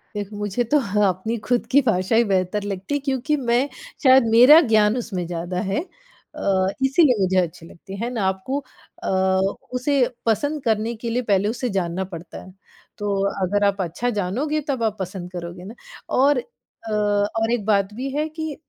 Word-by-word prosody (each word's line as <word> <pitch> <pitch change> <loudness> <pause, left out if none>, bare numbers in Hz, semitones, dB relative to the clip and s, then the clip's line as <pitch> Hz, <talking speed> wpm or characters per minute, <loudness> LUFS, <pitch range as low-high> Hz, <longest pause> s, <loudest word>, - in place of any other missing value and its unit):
देखो 205 0 -5
मुझे 210 +3 -1
तो 290 +6 +2
हाँ, 210 -3 +1
अपनी 220 +6 -3
खुद 245 -1 +1
की 285 +2 +6
भाषा 220 -3 +1
ही 235 - +5
बेहतर 190 +2 0
लगती 195 +5 -4
है - - 0
क्योंकि 270 +3 0
मैं 250 +4 +3 0.4
शायद 260 -1 +7
मेरा 255 +8 +9
ज्ञान 215 +2 +4
उसमें 190 -7 -3
ज़्यादा 175 +1 -4
है 195 - 0 0.6
अ, 190 -1 +1
इसलिए 265 -3 +4
मुझे 190 0 +1
अच्छी 170 -2 -1
लगती 195 +3 -11
है 240 - -1
ना? 220 -4 -1
आपको 190 +9 -2 0.4
अ, - - -2 0.6
उसे 255 +3 0 0.3
पसंद 290 +6 0
करने 225 +1 0
के 230 +1 -5
लिए 245 +2 0
पहले 200 +2 +3
उसे 245 +1 -2
जानना 175 +1 -1
पड़ता 170 0 -8
है। 185 - -13 0.5
तो 205 -1 -2 0.3
अगर 205 +2 0
आप 200 -1 0
अच्छा 185 +8 -2
जानोगे 285 +12 -1
तब 260 -5 -1
आप 215 -1 0
पसंद 185 -1 -6
करोगे 175 0 -7
ना 210 +4 -9 0.4
और 275 +1 +4
अ, 230 - -12
और 210 +2 +1
एक 225 -4 -1
बात 200 -1 +1
भी 260 +4 -4
है 305 +1 0
कि 315 -2 -5
215 Hz, 185 wpm, -22 LUFS, 190-250 Hz, 0.6 s, मेरा